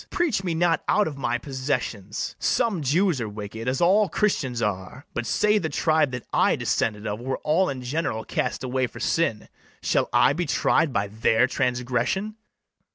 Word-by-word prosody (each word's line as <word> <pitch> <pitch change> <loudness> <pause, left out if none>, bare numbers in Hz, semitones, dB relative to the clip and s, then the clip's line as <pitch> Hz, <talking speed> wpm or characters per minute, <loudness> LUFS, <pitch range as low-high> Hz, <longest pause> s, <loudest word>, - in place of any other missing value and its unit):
Preach 305 - 0
me 175 -3 -1
not 170 0 +2
out 210 - +3
of 150 - -5
my 125 -3 -1
possessions. 125 -6 -3
Some 225 -9 +1
Jews 155 +1 +2
are 110 - -3
wicked, 105 +2 -7
as 130 +1 0
all 195 +4 +4
Christians 135 - 0
are: 105 +4 -3
But 120 -1 -3
say 210 - +3
the 160 - -2
tribe 155 0 +2
that 125 -1 -6
I - - +3
descended 105 -1 -1
of 105 0 -3
Were 130 +2 -2
all 170 +5 +2
in 130 -2 -5
general 125 -4 -2
cast - - -2
away 130 0 0
for - - -12
sin, 115 -11 0 0.4
Shall - - +1
I - - +4
be 170 +2 -2
tried 155 +1 +2
by 100 -4 0
their 110 +3 +2
transgression? 125 - -1
130 Hz, 175 wpm, -25 LUFS, 115-170 Hz, 0.4 s, all